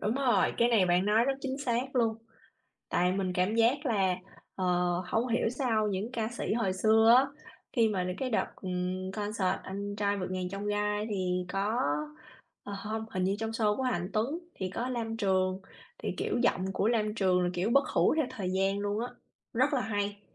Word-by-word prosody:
Đúng 215 - 0
rồi, 250 -7 +2
cái 235 - +4
này 220 -6 +4
bạn 175 +1 +3
nói 215 +3 +4
rất 275 - +2
chính 270 0 -3
xác 260 0 -1
luôn. 230 -2 +3 0.7
Tại 180 +1 +2
mình 190 -1 -1
cảm 185 +4 +1
giác 245 +6 +3
là, 195 -6 +2 0.4
ờ, 185 - -2 0.4
hông 230 +6 0
hiểu 235 -1 +1
sao 230 -4 0
những 205 +4 -3
ca 225 -3 -1
sĩ 240 -2 -3
hồi 220 -5 +1
xưa 220 +4 +5
á, 265 +2 +5 0.5
khi 230 -4 +3
mà 190 -4 -1
đ - - -3
cái 260 -1 -2
đợt, 220 - +1
ừm, 185 0 -3
concert 205 -2 -1
"Anh 200 +1 -5
trai 205 -1 +1
vượt 185 -1 -4
ngàn 185 -1 -2
chông 195 +2 -5
gai" 210 0 0
thì 180 -2 -1
có 205 +4 0 0.8
ờ, 205 - -6
hông, 220 +2 -4
hình 185 -1 -1
như 195 +2 +1
trong 220 0 -2
show 215 -2 +1
của - - -2
Hà 255 -1 +1
Anh 180 -1 -2
Tuấn 240 +10 0 0.2
thì 185 -1 -4
có 245 - -2
Lam 230 -3 -3
Trường 190 -3 +1 0.4
thì, - - -3
kiểu, - - -1
giọng 190 -6 +1
của 200 - +1
Lam 215 -3 +1
Trường 185 -4 +2
là, 180 - +1
kiểu, 185 +5 0
bất 275 +3 +4
hủ - - +3
theo 310 -4 +2
thời 185 -3 -3
gian 195 +1 +1
luôn 205 +1 -1
á, 240 - -1 0.5
rất 260 +5 +2
là 265 - +2
hay. 205 -2 -2
210 Hz, 210 wpm, -30 LUFS, 190-235 Hz, 0.8 s, xưa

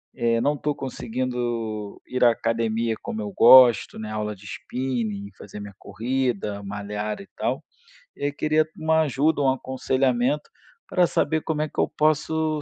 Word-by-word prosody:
eh, 115 -1 +1
não 145 - +2
estou 150 0 -2
conseguindo 120 -5 -3
ir 125 0 -1
à 120 - +7
academia 115 0 -1
como 225 -2 -4
eu 205 -2 -4
gosto, 125 -2 +7
né, 110 0 -6
aula 105 0 -3
de 95 - -18
spinning, 110 -1 -3
fazer 105 +1 -10
minha 100 -1 -9
corrida, 120 -4 -2
malhar 105 +1 -4
e 200 - -12
tal. - - -1 0.5
E - - -9
aí 145 - +1
queria 155 +2 +1
uma 160 0 +2
ajuda, 145 +1 +1
um 135 - +4
aconselhamento, 130 +1 0 0.4
para 180 -1 +3
saber 160 -2 0
como 155 -1 -2
é 155 - 0
que - - -7
eu - - +3
posso 155 0 +1
125 Hz, 160 wpm, -24 LUFS, 110-150 Hz, 0.5 s, à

